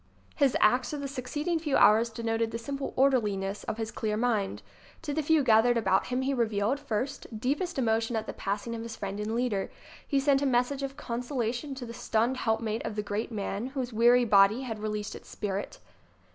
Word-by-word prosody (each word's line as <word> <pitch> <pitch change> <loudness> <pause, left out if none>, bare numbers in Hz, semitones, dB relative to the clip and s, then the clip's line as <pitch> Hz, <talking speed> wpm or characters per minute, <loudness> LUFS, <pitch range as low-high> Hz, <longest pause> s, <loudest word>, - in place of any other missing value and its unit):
His 275 -3 +3
acts 250 +6 +3
of 295 - -3
the 280 - -3
succeeding 295 +5 -2
few 300 -4 +1
hours 215 +3 +5
denoted 225 0 -1
the 230 - -4
simple 275 +4 -4
orderliness 210 -7 +1
of - - -3
his 225 -1 -3
clear 215 -1 -2
mind. 220 -4 0 0.4
To 295 -3 -3
the 315 - 0
few 310 0 +3
gathered 235 0 +5
about 195 -4 +2
him 250 +1 -1
he 275 +1 0
revealed, 225 +1 0
first, 235 -1 -4
deepest 290 +9 -1
emo 225 -4 +2
tion 230 +1 -3
at 220 -1 -1
the - - -5
passing 205 +4 -3
of 230 - -4
his 230 -1 -6
friend 200 0 -5
and 215 +2 -2
leader. 235 -5 -1 0.4
He 280 - +2
sent 275 0 +3
a 285 - +2
message 255 +2 +1
of 275 0 -4
consolation 245 +1 -3
to 260 -2 -6
the 230 - -8
stunned 235 +2 0
helpmate 225 -1 -1
of 210 - -4
the 210 - -2
great 210 +3 -3
man 205 +1 -3
whose 260 -3 -4
weary 240 +2 +5
body 205 +2 +5
had 225 -4 -5
released 210 -1 -3
its - - -11
spirit. 200 -1 -4
235 Hz, 205 wpm, -29 LUFS, 215-265 Hz, 0.4 s, hours